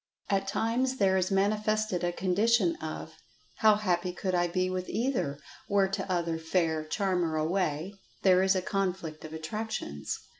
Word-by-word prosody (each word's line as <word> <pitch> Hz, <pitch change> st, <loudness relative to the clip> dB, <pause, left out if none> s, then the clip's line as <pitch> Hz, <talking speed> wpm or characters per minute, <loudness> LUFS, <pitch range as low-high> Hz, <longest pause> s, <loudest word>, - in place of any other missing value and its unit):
At 195 Hz, 0 st, +1 dB
times 245 Hz, +6 st, 0 dB
there 195 Hz, -3 st, +3 dB
is 185 Hz, -1 st, +1 dB
manifested 210 Hz, -1 st, +1 dB
a 175 Hz, -, +1 dB
condition 190 Hz, +1 st, +2 dB
of 160 Hz, 0 st, -6 dB, 0.4 s
"how 215 Hz, -1 st, +6 dB
happy 180 Hz, -4 st, 0 dB
could 185 Hz, +1 st, -3 dB
I 175 Hz, -1 st, +2 dB
be 185 Hz, +1 st, 0 dB
with 185 Hz, 0 st, -3 dB
either, 225 Hz, -, -1 dB, 0.3 s
were 200 Hz, -1 st, +4 dB
t'other 175 Hz, -4 st, -1 dB
fair 160 Hz, -1 st, 0 dB
charmer 180 Hz, -1 st, 0 dB
away"—there 180 Hz, +3 st, 0 dB
is 190 Hz, 0 st, +3 dB
a 185 Hz, -, 0 dB
conflict 185 Hz, -5 st, -2 dB
of 155 Hz, -, -8 dB
attractions. 160 Hz, -, -4 dB
185 Hz, 145 wpm, -29 LUFS, 170-200 Hz, 0.4 s, how